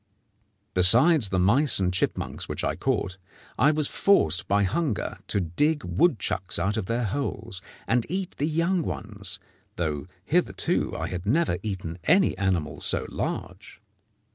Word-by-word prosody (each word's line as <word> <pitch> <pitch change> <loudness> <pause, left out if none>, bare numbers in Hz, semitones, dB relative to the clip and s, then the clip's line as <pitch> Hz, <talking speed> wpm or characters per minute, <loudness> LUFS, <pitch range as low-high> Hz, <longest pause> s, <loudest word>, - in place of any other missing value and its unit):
Besides 120 - +5
the 95 - 0
mice 120 +11 +4
and 90 -2 +1
chipmunks 90 - -2
which - - -3
I - - 0
caught, 95 +1 -2 0.4
I 145 - +5
was 150 -1 0
forced 90 - +2
by 100 +1 +2
hunger 110 - -1
to 100 - +1
dig 145 - 0
woodchucks 95 - 0
out 95 +4 0
of 110 -4 -3
their 120 +1 -1
holes, 115 -5 -4 0.2
and 120 0 +1
eat 190 0 -3
the 145 - 0
young 170 +3 +1
ones, 100 - -5 0.4
though 75 -4 -3 0.2
hitherto - - 0
I - - -3
had 90 +1 -5
never 160 +9 +1
eaten 95 -5 -5
any 185 +3 +4
animal 90 -6 -1
so - - 0
large. - - -5
105 Hz, 145 wpm, -26 LUFS, 90-150 Hz, 0.4 s, Besides